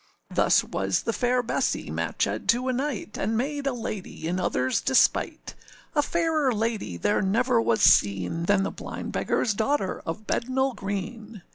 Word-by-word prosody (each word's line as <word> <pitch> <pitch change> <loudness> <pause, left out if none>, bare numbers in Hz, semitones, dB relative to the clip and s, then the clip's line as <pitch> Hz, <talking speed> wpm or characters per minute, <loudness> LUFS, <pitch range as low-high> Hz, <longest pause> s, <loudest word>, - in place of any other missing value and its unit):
Thus - - +4
was 95 0 -1
the 230 - -1
fair 245 +1 +1
Bessee 230 - -1
matchèd - - -2
to 245 +2 +2
a 255 - +1
knight, 255 -5 -3
And 220 +3 0
made 280 +3 -2
a - - +2
lady 215 -8 -5
in 180 +2 -1
otherâs 130 -7 0
despite. 265 -1 +2 0.4
A 295 - +3
fairer 315 -3 +1
lady 215 - -2
there 105 +4 +1
never 230 +5 +2
was 225 -2 +1
seen 100 - +3
Than 200 +1 +3
the - - -2
blind - - -7
beggarâs 215 - 0
daughter 220 -3 0
of 210 +7 -5
Bednall 260 +3 0
Green. 205 +1 -5
225 Hz, 160 wpm, -26 LUFS, 190-255 Hz, 0.4 s, Thus